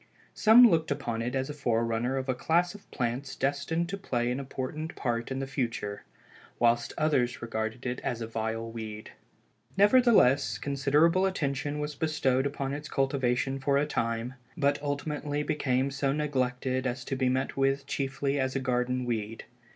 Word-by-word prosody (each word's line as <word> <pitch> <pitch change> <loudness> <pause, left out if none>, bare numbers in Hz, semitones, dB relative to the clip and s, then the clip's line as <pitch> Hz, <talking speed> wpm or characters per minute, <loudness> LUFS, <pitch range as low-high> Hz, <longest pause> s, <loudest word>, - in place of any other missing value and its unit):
Some 235 +3 +8
looked 160 -6 +2
upon 120 -5 -2
it 120 +3 -2
as 130 0 0
the - - -4
forerunner 120 -1 0
of 130 0 -3
a 130 - +2
class 170 +7 +1
of 205 - -14
plants 125 +2 -3
destined 145 +5 -1
to 195 +2 -4
play 120 -9 -1
an 125 - -2
important 140 +4 -5
part 120 -2 -2
in 130 - -3
the 135 - -2
future, 115 -6 -3 0.5
whilst 120 0 +2
others 135 -6 +1
regarded 110 +2 -3
it 125 0 -2
as 120 -3 -3
a 115 - -3
vile 115 0 -3
weed. 110 -2 -7 0.7
Nevertheless, 205 - +5
considerable 150 +7 +2
attention 145 -5 -2
was 150 0 -3
bestowed 135 -3 +1
upon 140 -1 -3
its 145 +1 -6
cultivation 135 -1 0
for 140 +1 +2
a 145 - +2
time; 115 -3 -2 0.2
but 140 -2 +1
ultimately 145 0 -2
became 135 -2 0
so 135 0 0
neglected 130 -3 -1
as 125 0 -4
to 135 - -2
be 130 -1 +1
met 130 +1 -1
with 135 0 +1
chiefly 140 +1 -1
as 130 0 -1
a - - +1
garden 125 -1 0
weed. 115 -2 -3
135 Hz, 165 wpm, -29 LUFS, 125-145 Hz, 0.7 s, Some